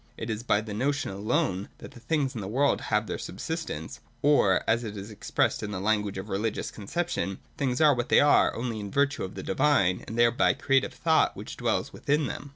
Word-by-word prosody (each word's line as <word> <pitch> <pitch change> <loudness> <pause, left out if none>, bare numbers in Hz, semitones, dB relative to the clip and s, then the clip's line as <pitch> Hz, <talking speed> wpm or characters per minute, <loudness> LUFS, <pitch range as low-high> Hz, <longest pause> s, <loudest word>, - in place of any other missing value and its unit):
It 115 0 -4
is 110 0 -3
by 105 -4 +2
the 105 -1 -7
notion 140 +3 -1
alone 100 -1 -1
that - - -11
the - - -13
things 135 +2 -1
in 115 - -5
the 95 - -5
world 135 +7 +1
have 105 0 +2
their 95 - -4
subsistence; 155 - -5 0.2
or, 135 -10 +4
as 115 +2 +2
it 105 -2 -6
is 100 +2 -7
expressed 105 - 0
in 105 - -4
the 100 -3 -4
language 105 -1 0
of 95 +2 -5
religious 105 +2 -2
conception, 105 - -3 0.2
things 130 -3 -1
are 150 -2 +7
what 120 -1 -3
they - - +6
are, 145 - +5
only 115 -2 -3
in 100 -1 -5
virtue 140 +5 +1
of 95 - -6
the - - -6
divine 115 -11 +2
and 110 - -6
thereby 120 0 +4
creative 135 -1 +1
thought 160 -1 +2
which - - -7
dwells - - -1
within 150 +1 0
them. 145 - -6
115 Hz, 215 wpm, -27 LUFS, 100-140 Hz, 0.2 s, are